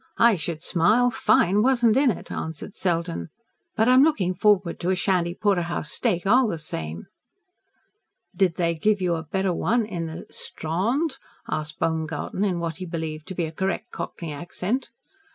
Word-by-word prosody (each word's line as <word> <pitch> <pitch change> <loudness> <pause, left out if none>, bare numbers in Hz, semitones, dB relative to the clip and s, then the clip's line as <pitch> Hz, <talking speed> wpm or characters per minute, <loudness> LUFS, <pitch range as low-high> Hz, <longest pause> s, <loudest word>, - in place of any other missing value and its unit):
I 235 -2 +6
should 160 -1 -5
smile! 220 +9 +3
Fine 205 -3 +3
wasn't 240 -2 +4
in 270 0 +4
it," 210 - -4
answered 160 +5 -5
Selden. 170 -2 -1 0.5
"But 220 0 +3
I'm 255 +2 +7
looking 200 - +2
forward 195 -2 +2
to 175 - -1
a 190 - +3
Shandy 180 -2 0
porterhouse 175 -7 0
steak, 195 -8 0
all 250 +5 +5
the 170 - -2
same." 80 - -6 1.3
"Did 185 -4 +2
they 170 -1 +1
give 205 +6 +1
you 180 -2 +1
a 165 - -2
better 190 +3 -1
one 230 +6 +1
in 175 -6 -4
the 160 +2 -7
Strawnd?" 235 - -2 0.3
asked 155 0 -3
Baumgarten, 160 +4 -2
in 190 -4 +1
what 170 -1 -3
he 185 - -5
believed 160 -2 -5
to 190 - -5
be 170 - 0
a 160 - -5
correct 190 +3 -2
Cockney 165 -3 -5
accent. 180 - -3
180 Hz, 170 wpm, -25 LUFS, 165-215 Hz, 1.3 s, I'm